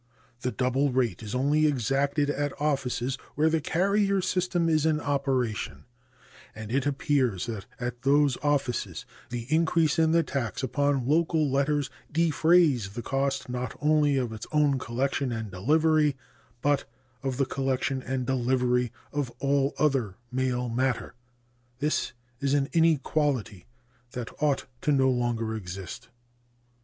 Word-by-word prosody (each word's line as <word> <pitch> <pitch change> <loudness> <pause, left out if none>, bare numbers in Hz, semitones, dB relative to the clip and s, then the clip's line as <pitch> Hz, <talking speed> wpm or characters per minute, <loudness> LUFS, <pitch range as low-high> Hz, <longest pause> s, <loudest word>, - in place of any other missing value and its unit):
The 125 0 -1
double 130 +3 +1
rate 120 -7 0
is 105 +1 -5
only 145 +4 +3
exacted 140 +2 +1
at 145 0 -3
offices 135 -3 -1 0.2
where 155 +2 +3
the 160 -1 +1
carrier 200 +4 +2
system 180 -2 0
is 155 -2 +2
in 155 -1 +2
operation, 135 -6 -1 0.7
and 110 0 -7
it 135 +2 +1
appears 135 -8 +1
that 110 -5 -6
at 120 -1 -4
those 140 0 +3
offices 140 -4 -1 0.2
the 120 -1 -4
increase 165 -1 +2
in 160 -1 +4
the 165 0 +4
tax 135 -3 -3
upon 135 0 +1
local 160 0 +2
letters 140 +1 +1 0.2
defrays 160 - +3
the 120 - -5
cost 135 +2 -1
not 125 -1 -4
only 150 -2 +3
of 125 -4 -1
its 110 - -7
own 145 -3 +3
collection 130 +2 -1
and 110 -3 -4
delivery, 150 - +2 0.5
but 145 -1 +2 0.4
of 135 -2 -2
the 135 - +2
collection 135 0 -1
and 130 0 -3
delivery 125 -1 +1 0.2
of 145 -3 -1
all 140 0 +1
other 135 -10 +1 0.2
mail 125 -1 0
matter. 125 +1 -1 0.6
This 150 +1 -1 0.3
is 140 0 +1
an 140 -1 +1
inequality 145 - +1 0.5
that 125 -2 -5
ought 145 -2 +1 0.2
no 135 -3 +4
longer 120 -2 -1
to - - -2
exist. 95 0 -8
135 Hz, 140 wpm, -27 LUFS, 125-150 Hz, 0.7 s, in